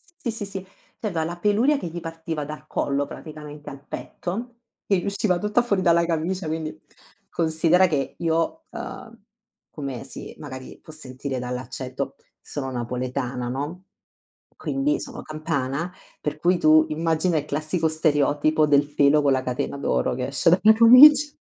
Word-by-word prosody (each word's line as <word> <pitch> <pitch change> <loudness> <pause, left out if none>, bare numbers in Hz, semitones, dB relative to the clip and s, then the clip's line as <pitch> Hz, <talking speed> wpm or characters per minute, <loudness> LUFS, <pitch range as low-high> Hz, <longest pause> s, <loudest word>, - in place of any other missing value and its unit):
Sì, 250 -8 -4
sì, 215 -2 -4
sì, 195 -1 -6
cioè 205 +3 -10
aveva 165 -4 -1
la 175 +2 -4
peluria 220 +10 +3
che 175 - -5
gli 170 +1 -6
partiva 165 -2 -5
dal 150 +1 -9
collo 140 -1 -1
praticamente 150 -1 -9
al 140 -1 -11
petto, 230 +7 -6 0.3
che 195 - +2
gli 180 - -3
usciva 200 -2 +1
tutta 210 +5 +1
fuori 205 -6 0
dalla 170 -1 +4
camicia, 170 +2 -2
quindi 155 -6 -4 0.5
considera 165 +3 +3
che 145 -5 -2
io, 165 - -1
uhm, 230 -1 -8 0.5
come 135 -4 -6
si 135 - -9
magari 130 -3 -9
può - - -12
sentire 130 -2 -6
dall'accento, 125 +2 -5 0.3
sono 135 -3 -5
napoletana, 125 +1 -3
no, 145 +9 -4 0.7
quindi 275 +2 -1
sono 240 -2 -7
campana, 155 +1 -3 0.3
per 150 0 -3
cui 175 +3 +3
tu, 155 -1 +5
immagina 160 +2 +1
il 150 - -1
classico 155 +3 -1
stereotipo 155 0 +2
del 145 -1 +3
pelo 145 +1 +4
con 140 -1 +3
la 130 -1 +1
catena 125 +2 -3
d'oro 65 - 0
che 125 0 -2
esce 140 +5 +2
dalla 200 +5 +6
camic 290 +6 +8
155 Hz, 155 wpm, -24 LUFS, 140-185 Hz, 0.7 s, camic